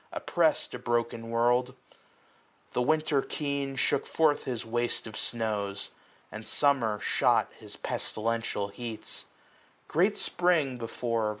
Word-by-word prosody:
Oppressed - - +1
a - - -5
broken 115 -1 -1
world: 120 +2 +2 1.0
The 125 - +1
Winter 155 +1 +2
keen 140 -2 -2
Shook - - +1
forth 155 -2 +2
his 120 -3 -3
waste 120 +1 -1
of 110 -1 -8
snows; 105 -4 -2 0.4
and 110 0 -7
Summer 125 -7 +2
shot - - +2
His - - -10
pestilential 115 -2 -2
heats. 110 +1 -6 0.6
Great 185 +7 +2
Spring, 160 -8 +2
before. 115 -1 -1
120 Hz, 115 wpm, -29 LUFS, 115-140 Hz, 1.0 s, world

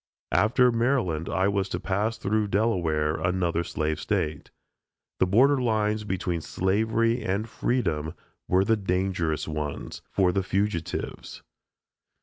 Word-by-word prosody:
After 125 +4 +4
Maryland 115 - 0
I 95 +1 +1
was 100 -1 0
to - - -3
pass 105 +4 -1
through 105 +1 0
Delaware 85 -8 +1
another 85 0 0
slave 80 -2 -2
State. 75 -1 -2 0.7
The 95 - +3
border 130 +8 +4
lines 110 -2 0
between 90 -4 -2
slavery 110 +7 +1
and 100 +4 -1
freedom 85 -10 -1 0.3
were 95 +2 +3
the 110 +1 +3
dangerous 90 -5 -1
ones, 75 -2 -4
for 95 -2 +2
the 95 - 0
fugitives. 95 -3 -3
95 Hz, 125 wpm, -26 LUFS, 85-110 Hz, 0.7 s, After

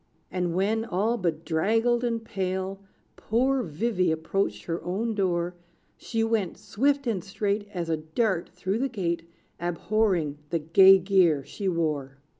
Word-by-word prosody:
And 180 -2 -1
when, 210 +4 +1
all 220 +2 0
bedraggled 195 +7 +1
and 230 -2 -1
pale, 190 -1 -3 0.4
Poor 260 +4 +1
Vivy 185 0 0
approached 160 - -1
her 165 +9 -4
own 210 +6 -1
door, 180 -3 0 0.4
She 225 -1 -2
went, 225 -5 0
swift 270 +8 0
and 210 -7 -1
straight 205 +1 -2
As 175 -4 -3
a 160 -1 0
dart, 170 +4 -1
through 185 +4 -2
the 270 +1 0
gate, 170 -7 -3 0.3
Abhorring 175 -3 0
the 170 - +1
gay 190 +5 +7
gear 180 -6 +3
she 200 - -5
wore. 150 -6 -2
190 Hz, 140 wpm, -27 LUFS, 170-220 Hz, 0.4 s, gay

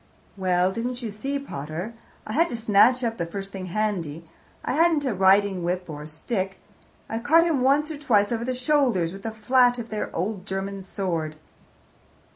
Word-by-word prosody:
"Well, 185 -1 +2
didn't 245 +4 -3
you 225 - -3
see, 270 +7 -3
pater, 170 - -5 0.3
I - - -5
had 335 +4 +3
to - - -3
snatch 230 +3 +4
up 230 -1 -2
the 170 - 0
first 195 +3 -6
thing 190 -2 -6
handy 175 -6 -2 0.4
I - - 0
hadn't 320 -1 +3
a 255 - 0
riding 190 -1 +4
whip 180 +1 -2
or 150 0 -7
stick. 190 +5 -3 0.5
I 225 - -3
caught 320 +8 +5
him 315 -6 +1
once 285 +4 +3
or 300 - -6
twice 210 -7 +2
over 230 0 -1
the 255 +1 -2
shoulders 250 - +2
with 195 - -9
the 225 - -3
flat 245 +3 +3
of 235 -1 -6
their 215 -1 -3
old 195 +2 -3
German 195 0 -3
sword." 170 -5 -3
210 Hz, 185 wpm, -25 LUFS, 185-250 Hz, 0.5 s, caught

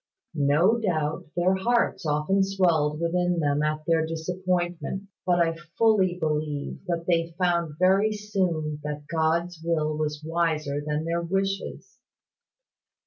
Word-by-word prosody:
"No 160 +9 +3
doubt 155 -9 -1
their 175 +2 +3
hearts 190 -3 +1
often 150 +7 +2
swelled 170 -6 +1
within 175 +1 +1
them 145 -1 +1
at 155 0 -1
their 165 -1 +2
disappointments: 175 +3 -2 0.2
but 175 -1 +3
I 165 -1 +2 0.2
fully 200 -6 +3
believe 150 -2 -2
that 170 -1 -2
they 165 -1 0
found 170 -4 0
very 195 +4 +4
soon 185 -8 -2
that 150 0 -5
God's 165 +1 0
will 155 -2 0
was 150 0 -3
wiser 160 -3 0
than 150 +1 -2
their 170 +1 -1
wishes. 195 +3 -3
170 Hz, 130 wpm, -26 LUFS, 155-185 Hz, 0.2 s, very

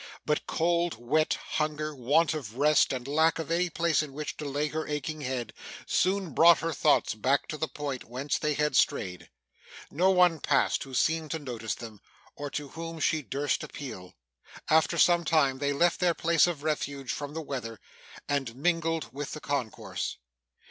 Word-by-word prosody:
But 150 -1 0
cold, 170 +1 +1
wet, 150 +7 +1
hunger, 155 0 -2
want 145 +5 +2
of 130 -7 -6
rest, 150 +2 +4
and 130 -1 -4
lack 160 +3 +3
of 160 -1 -5
any 175 +1 +1
place 165 -2 +1
in 150 -3 -7
which 150 +1 -5
to 150 - -6
lay 145 +2 -1
her 155 +1 -3
aching 150 +1 -3
head, 125 -5 -3 0.3
soon 190 -2 +1
brought 170 +1 +7
her 165 0 -1
thoughts 150 +1 +3
back 130 +6 +1
to - - -3
the 160 - 0
point 140 -2 -5
whence 130 +5 -2
they 150 -1 0
had 150 +1 0
strayed. 90 -10 +1 0.6
No 180 +6 +3
one 180 -3 +4
passed - - +2
who 135 -1 -8
seemed 160 +3 +1
to 160 - -2
notice 120 -7 -4
them, 110 -4 -10 0.3
or 145 0 -5
to 145 0 -5
whom 165 +1 -7
she 160 0 +1
durst 140 0 -1
appeal. 110 -10 -8 0.6
After 160 0 +4
some 175 -1 +5
time, 140 -5 +2
they 145 0 0
left 170 +5 +2
their 175 -2 +2
place 170 0 +3
of 160 -5 -3
refuge 140 -3 -2
from 145 +1 -5
the - - -2
weather, 120 -7 -5 0.5
and 135 -5 -1
mingled 165 +2 0
with 145 +1 -5
the 155 - -5
concourse. 140 -7 -3
150 Hz, 180 wpm, -28 LUFS, 135-160 Hz, 0.6 s, brought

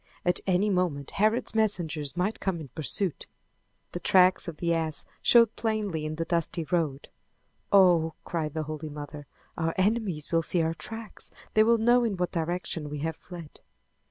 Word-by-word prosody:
At 180 0 +3
any 195 +3 +2
moment 170 -7 -1
Herod's 215 +3 +1
messengers 175 -9 0
might 195 +5 -1
come 190 -4 -2
in 150 -4 -9
pursuit. 160 - -2 0.6
The 175 - -4
tracks 185 0 +4
of 165 -3 -6
the 170 -1 0
ass 160 -2 -1 0.2
showed 230 -2 +5
plainly 205 -9 -2
in 155 - -4
the 165 +1 -2
dusty 170 0 -1
road. 155 -4 -2 0.6
"Oh!" 175 -5 +5
cried 160 -3 -3
the 155 - -1
Holy 155 0 -6
Mother, 145 0 -8 0.3
"Our 165 0 -1
enemies 190 -6 0
will 165 -1 +3
see 165 +1 +2
our 160 0 0
tracks! 225 +5 -5 0.2
They 215 - +5
will 230 +1 +4
know 240 +2 +4
in 215 -5 -1
what 180 0 -1
direction 165 -2 -3
we 150 - -5
have 160 -1 -2
fled!" 170 -4 -11
170 Hz, 170 wpm, -27 LUFS, 155-200 Hz, 0.6 s, showed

